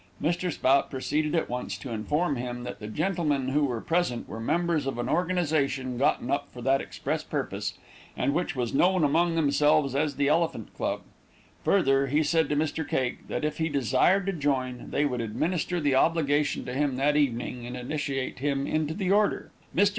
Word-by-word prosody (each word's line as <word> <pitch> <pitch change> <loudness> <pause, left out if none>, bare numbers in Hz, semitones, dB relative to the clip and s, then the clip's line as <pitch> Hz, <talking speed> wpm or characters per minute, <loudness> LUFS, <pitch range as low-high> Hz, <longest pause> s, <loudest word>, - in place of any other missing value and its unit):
Mr. 175 +2 0
Spout 135 -1 +2
proceeded 150 +4 -1
at 165 - +1
once 125 +1 -4
to 130 - -8
inform 145 +8 0
him 120 0 -4
that 125 - -6
the 105 - -7
gentlemen 150 - 0
who 145 +2 +2
were 120 -4 -2
present 165 -8 0
were 110 - -7
members 165 +3 0
of 135 - -2
an 120 0 -2
organization 145 -7 0
gotten 130 -1 +1
up 140 0 0
for 125 - -11
that 135 +3 +2
express 90 -2 -3
purpose, - - -3 0.4
and 140 - +1
which 175 0 -1
was 125 -3 -2
known 180 +4 +3
among 165 +4 +2
themselves 150 -2 +3
as 145 0 0
the 140 +1 +1
Elephant 165 +3 0
Club; - - -2 0.6
further 135 -8 +3
he 150 +4 +2
said 160 0 +2
to 150 - +1
Mr. 155 +1 0
Cake, 130 -2 -2
that - - -2
if 150 - -2
he 160 0 +1
desired 145 - +2
to 195 - 0
join, 130 -6 -1
they 145 - +1
would 125 -4 -1
administer 165 +10 -1
the 145 -3 +1
obligation 145 0 +2
to 125 - -5
him 140 0 0
that 145 +3 +2
evening, 125 -3 0
and 125 +1 -5
initiate 135 0 -3
him 140 0 0
into 155 0 -1
the 190 -1 -1
order. 205 +1 +2 0.2
Mr. 200 +3 +5
145 Hz, 190 wpm, -27 LUFS, 130-160 Hz, 0.6 s, Mr